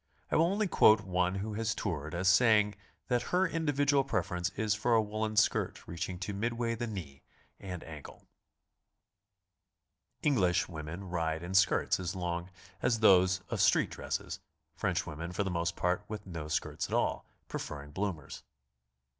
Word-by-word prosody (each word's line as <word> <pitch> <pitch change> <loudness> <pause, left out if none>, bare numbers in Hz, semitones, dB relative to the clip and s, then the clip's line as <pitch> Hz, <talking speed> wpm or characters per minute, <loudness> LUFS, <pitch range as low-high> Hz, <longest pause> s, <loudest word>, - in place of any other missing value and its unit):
I - - +2
will 165 +2 +5
only 205 +3 +1
quote 110 -10 +6
one 90 -1 0
who 105 +3 -3
has 110 +1 -1
toured 80 -5 -3
as 90 +2 0
saying 105 0 +5 0.3
that 125 -2 +1
her 185 +1 +3
individual 145 -4 +2
preference 90 -9 -1
is 110 -1 +1
for 115 +3 +2
a - - +6
woolen 110 0 -3
skirt 110 - +1
reaching 85 +2 -4
to 100 +2 -3
midway 115 +3 -1
the 120 +1 -3
knee 80 -10 -7 0.4
and 90 -3 -6
ankle. 80 -3 -11 2.0
(Eng 145 -3 +3
lish 90 -2 +2
women 80 +2 -6
ride 80 -3 -2
in 90 +2 -5
skirts 95 -1 +3
as 90 0 -3
long 85 -1 -3 0.3
as 115 -2 +1
those 95 -2 +5
of - - -1
street - - +4
dresses; - - -4 0.4
French - - -1
women 85 +3 -6
for 100 - 0
the 95 - -2
most 85 0 -1
part 90 0 0
with 105 -1 -6
no 85 -5 -6
skirts 75 - -2
at - - -2
all, - - 0 0.2
pre - - -4
ferring 75 0 -7
bloomers.) 95 -7 -4
95 Hz, 165 wpm, -31 LUFS, 85-110 Hz, 2.0 s, quote